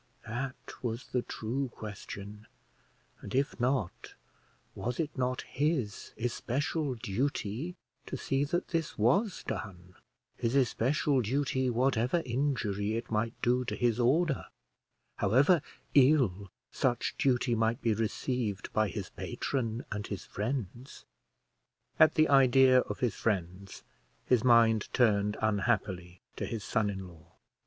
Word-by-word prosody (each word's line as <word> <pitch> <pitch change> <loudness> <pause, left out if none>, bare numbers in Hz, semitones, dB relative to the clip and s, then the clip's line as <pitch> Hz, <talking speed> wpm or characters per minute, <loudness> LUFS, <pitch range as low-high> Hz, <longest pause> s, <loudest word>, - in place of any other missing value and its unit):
that 130 +4 -3 0.3
was 120 0 -4
the 125 - 0
true 125 +4 -3
question: 105 0 -8 0.7
and 105 - -6
if 140 +1 0
not, 125 -6 -1 0.6
was 125 0 -4
it 155 -3 -2
not 125 -1 -1
his 135 -7 -2
especial 130 +5 -1
duty 125 - -2 0.3
to 130 - -4
see 135 +2 0
that 175 +5 -2
this 165 -1 -2
was 180 - +2
done, 90 -3 -6 0.4
his 115 +3 -1
especial 135 +2 +2
duty, 130 +2 0
whatever 125 +5 +1
injury 115 -6 -1
it 115 0 -5
might 110 +1 -1
do 125 +1 +3
to 125 - -3
his 120 -1 +1
order, 140 +5 +2 0.7
however 135 - +4 0.3
ill 125 -9 +4 0.2
such 125 -4 0
duty 125 -2 +2
might 115 +1 +1
be 115 -5 +1
received 110 -1 -2
by 110 0 +2
his - - -6
patron 120 -3 -3
and 105 0 -3
his 100 - -5
friends? 120 +2 -5 0.9
At 155 - +6
the 155 0 +5
idea 130 -1 +6
of - - -4
his 125 -4 +1
friends, 95 -2 -3 0.4
his 125 -2 +3
mind 115 -3 +4
turned 105 -4 +3
unhappily 100 -4 0 0.2
to - - -3
his 115 -3 -4
son 110 -3 +1
in 95 -2 -5
law. 85 -3 -17
120 Hz, 130 wpm, -31 LUFS, 105-135 Hz, 0.9 s, At